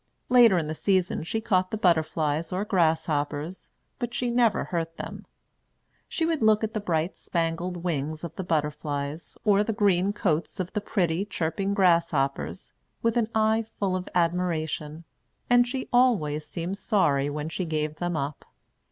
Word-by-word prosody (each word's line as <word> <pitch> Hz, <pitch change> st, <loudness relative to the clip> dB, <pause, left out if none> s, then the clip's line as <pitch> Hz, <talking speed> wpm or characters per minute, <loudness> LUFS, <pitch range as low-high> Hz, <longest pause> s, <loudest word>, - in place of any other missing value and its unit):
Later 240 Hz, -6 st, +7 dB
in 165 Hz, -, 0 dB
the 155 Hz, -, -3 dB
season 185 Hz, +2 st, +1 dB
she 200 Hz, +7 st, -2 dB
caught 185 Hz, -4 st, +1 dB
the 220 Hz, -, -3 dB
butterflies 160 Hz, -3 st, +1 dB
or 185 Hz, +3 st, -1 dB
grasshoppers, 160 Hz, -2 st, 0 dB, 0.3 s
but 240 Hz, -1 st, -3 dB
she 245 Hz, -1 st, 0 dB
never 235 Hz, -3 st, +3 dB
hurt 165 Hz, -1 st, -3 dB
them. -, -, -7 dB, 0.8 s
She 325 Hz, -, -1 dB
would 325 Hz, -4 st, 0 dB
look 220 Hz, 0 st, +4 dB
at 220 Hz, 0 st, -2 dB
the 215 Hz, -, -1 dB
bright 170 Hz, -3 st, -1 dB
spangled 170 Hz, +1 st, -2 dB
wings 155 Hz, -2 st, -2 dB
of 170 Hz, -, -6 dB
the 190 Hz, -, -4 dB
butterflies, 150 Hz, -1 st, -3 dB
or 205 Hz, -1 st, +4 dB
the 225 Hz, -, -2 dB
green 200 Hz, -2 st, +2 dB
coats 175 Hz, -2 st, -1 dB
of 185 Hz, -1 st, -3 dB
the 210 Hz, -, -1 dB
pretty, 180 Hz, -4 st, 0 dB
chirping 195 Hz, +1 st, -2 dB
grasshoppers, 150 Hz, -, +1 dB, 0.3 s
with 230 Hz, 0 st, +2 dB
an 230 Hz, -2 st, +1 dB
eye 220 Hz, +1 st, +2 dB
full 195 Hz, -2 st, 0 dB
of 185 Hz, 0 st, -4 dB
admiration; 165 Hz, -3 st, -1 dB, 0.5 s
and 245 Hz, 0 st, +6 dB
she 255 Hz, +1 st, -4 dB
always 185 Hz, -13 st, +2 dB
seemed 180 Hz, +3 st, -4 dB
sorry 145 Hz, -12 st, +2 dB
when 150 Hz, +1 st, -4 dB
she 175 Hz, +3 st, -3 dB
gave 155 Hz, -2 st, -2 dB
them 175 Hz, -1 st, -2 dB
up. 140 Hz, 0 st, -4 dB
175 Hz, 160 wpm, -26 LUFS, 155-205 Hz, 0.8 s, Later